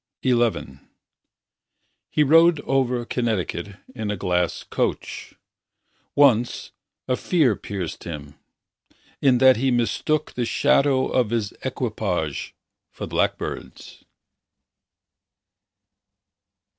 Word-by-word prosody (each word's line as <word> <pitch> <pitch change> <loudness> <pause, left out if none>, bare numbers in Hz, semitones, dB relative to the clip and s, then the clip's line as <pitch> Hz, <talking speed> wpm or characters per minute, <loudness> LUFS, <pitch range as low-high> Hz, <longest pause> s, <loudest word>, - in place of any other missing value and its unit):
XI 120 - 0 1.3
He 150 - +2
rode 165 +2 +5
over 125 -3 0
Connecticut 105 -5 -2 0.2
In 110 -4 -4
a 105 - -2
glass 90 -1 -1
coach. - - -3 0.8
Once, 125 -5 +3 0.4
a 125 - +1
fear 145 - +2
pierced 95 -5 -6
him, 75 -4 -7 0.9
In 130 -3 +4
that 130 -1 +6
he 135 +3 +1
mistook 130 +5 0
The 125 - -1
shadow 135 +2 +2
of 125 -4 +1
his 110 -3 -1
equipage 105 - -3 0.3
for - - -7
blackbirds. - - -3
120 Hz, 90 wpm, -23 LUFS, 100-130 Hz, 1.3 s, that